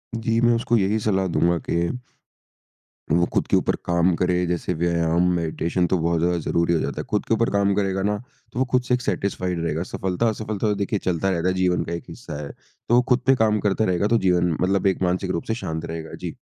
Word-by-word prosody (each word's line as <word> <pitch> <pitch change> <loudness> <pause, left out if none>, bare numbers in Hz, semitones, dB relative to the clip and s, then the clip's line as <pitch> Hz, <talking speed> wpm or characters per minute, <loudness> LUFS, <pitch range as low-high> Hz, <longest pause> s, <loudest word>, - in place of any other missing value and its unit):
जी, 115 0 0
मैं 120 0 +4
उसको 120 +1 +1
यही 105 +1 +1
सलाह 95 -3 +1
दूँगा 85 0 +2
कि, 85 0 +1 1.2
वो 85 +2 +4
खुद - - +1
के - - +2
ऊपर - - +1
काम 85 +1 +2
करे। 90 0 +1
जैसे 90 +1 -1
व्यायाम, 85 0 +1
मेडिटेशन 85 +1 -1
तो 95 - +1
बहुत 85 0 +1
ज़्यादा 85 +1 +1
ज़रूरी 85 +1 +1
हो 85 - +2
जाता 70 -1 -3
है। - - -6
खुद - - 0
के - - +1
ऊपर 115 +1 +2
काम 100 0 +2
करेगा 95 -1 0
ना, 105 +1 +1 0.4
तो - - -3
वो 130 - +3
खुद 125 - +3
से 125 - -1
एक 125 - +1
सैटिस्फाइड 95 -6 -2
रहेगा। 80 0 -1
सफलता-असफलता 110 +3 -2
तो 105 - +1
देखिए 100 +1 -1
चलता 90 +1 -1
रहता 90 -1 0
है, 95 - +2
जीवन 90 -1 +1
का 85 - -5
एक 85 - -4
हिस्सा 75 0 -7
है। 70 - -7 0.4
तो 120 - +5
वो 125 - +6
खुद 125 -1 +4
पे 135 - +6
काम 110 -3 +2
करता 100 +2 +1
रहेगा, 90 +1 +1
तो 115 - +3
जीवन 90 -4 +2
मतलब 95 +1 +2
एक 95 - 0
मानसिक 90 +1 0
रूप 85 - -2
से 110 - 0
शांत 80 +1 -3
रहेगा। 80 -1 -6
जी। - - -6
90 Hz, 235 wpm, -23 LUFS, 85-105 Hz, 1.2 s, वो